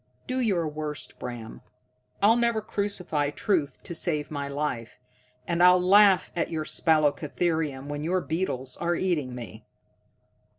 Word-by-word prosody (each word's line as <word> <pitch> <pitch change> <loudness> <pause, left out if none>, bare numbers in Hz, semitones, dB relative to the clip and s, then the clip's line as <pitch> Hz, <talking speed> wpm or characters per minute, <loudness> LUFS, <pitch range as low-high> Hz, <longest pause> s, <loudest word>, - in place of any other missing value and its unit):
Do 255 0 -2
your 190 -9 +1
worst, 150 -4 -4
Bram, 120 -2 -7 0.6
I'll 220 +3 +6
never 235 -2 +2
crucify 195 -8 -2
truth 150 -1 -1
to - - -6
save 155 -3 -1
my 140 -2 -3
life. 140 -5 -3 0.5
And 170 0 0
I'll 180 0 +7
laugh 195 +1 +5
at 170 - -1
your 155 -1 -3
spalacotherium 155 -2 0
when 145 +1 -5
your 180 +4 +1
beetles 155 -7 -3
are 170 0 0
eating 150 -9 -1
me." 115 -2 -9
160 Hz, 135 wpm, -27 LUFS, 145-180 Hz, 0.6 s, I'll